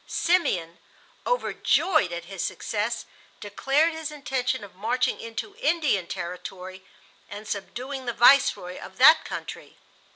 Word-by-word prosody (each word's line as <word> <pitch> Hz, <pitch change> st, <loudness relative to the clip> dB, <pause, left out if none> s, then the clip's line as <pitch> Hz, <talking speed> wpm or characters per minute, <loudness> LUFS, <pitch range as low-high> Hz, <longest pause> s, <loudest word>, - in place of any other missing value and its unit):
Simeon, 185 Hz, -, 0 dB, 0.5 s
overjoyed 380 Hz, -, +1 dB
at 170 Hz, 0 st, -5 dB
his 190 Hz, 0 st, -5 dB
success, 220 Hz, +2 st, -3 dB, 0.3 s
declared 275 Hz, +10 st, +1 dB
his 320 Hz, -1 st, -5 dB
intention 260 Hz, -5 st, -2 dB
of 200 Hz, -, -11 dB
marching 235 Hz, +7 st, -1 dB
into 230 Hz, -, -6 dB
Indian 300 Hz, -, +1 dB
territory 185 Hz, +1 st, -7 dB, 0.5 s
and 205 Hz, +1 st, -9 dB
subduing 255 Hz, +6 st, -5 dB
the 240 Hz, -, -1 dB
Viceroy 240 Hz, -8 st, +4 dB
of 190 Hz, -, -11 dB
that 310 Hz, +6 st, +7 dB
country. -, -, -8 dB
230 Hz, 120 wpm, -25 LUFS, 190-280 Hz, 0.5 s, that